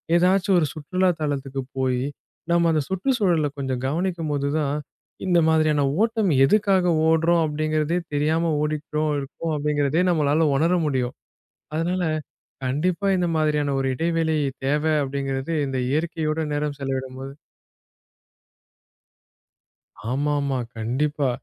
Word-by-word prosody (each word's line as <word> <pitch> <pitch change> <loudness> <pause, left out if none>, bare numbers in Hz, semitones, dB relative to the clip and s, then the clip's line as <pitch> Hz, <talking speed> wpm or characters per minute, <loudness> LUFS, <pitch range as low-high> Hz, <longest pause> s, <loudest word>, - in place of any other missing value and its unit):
எதாச்சும் 185 +2 +3
ஒரு 155 - +1
சுற்றுலா 185 +5 0
தலத்துக்குப் 135 -2 -3
போயி, 130 -1 +1 0.5
நம்ம 170 -1 +4
அந்த 155 -1 +2
சுற்றுச் 190 +8 0
சூழல 170 -7 +2
கொஞ்சம் 130 -2 -3
கவனிக்கும்போது 155 -3 -1
தான், 145 -1 0 0.5
இந்த 175 -2 +3
மாதிரியான 155 -2 +3 0.2
ஓட்டம் 225 -3 +2
எதுக்காக 190 +2 +3 0.2
ஓடுறோம்? 165 +1 +3
அப்டிங்கிறதே 155 +2 0 0.2
தெரியாம 160 +3 +1
ஓடிக்கிட்டு 150 0 -1
இருக்கோம், 145 +4 -4
அப்டிங்கிறதே 145 +2 +1
நம்மளால 155 -1 +2
உணர 165 +6 +2
முடியும். 130 -3 -1 0.6
அதனால, 175 +3 0 0.6
கண்டிப்பா 170 +9 0
இந்த 180 -1 +1
மாதிரியான 150 -2 +1
ஒரு 135 - 0
இடைவெளி 165 +1 0 0.3
தேவை 150 +3 +1
அப்டிங்கிறது, 135 +2 -3
இந்த 135 -1 -3
இயற்கையோடு 160 0 -1
நேரம் 145 -1 -2
செலவிடும்போது 135 0 -4 2.8
ஆமா, 145 +3 0
ஆமா. 140 -2 -1 0.2
கண்டிப்பா. 140 +5 0
155 Hz, 110 wpm, -23 LUFS, 140-170 Hz, 2.8 s, நம்ம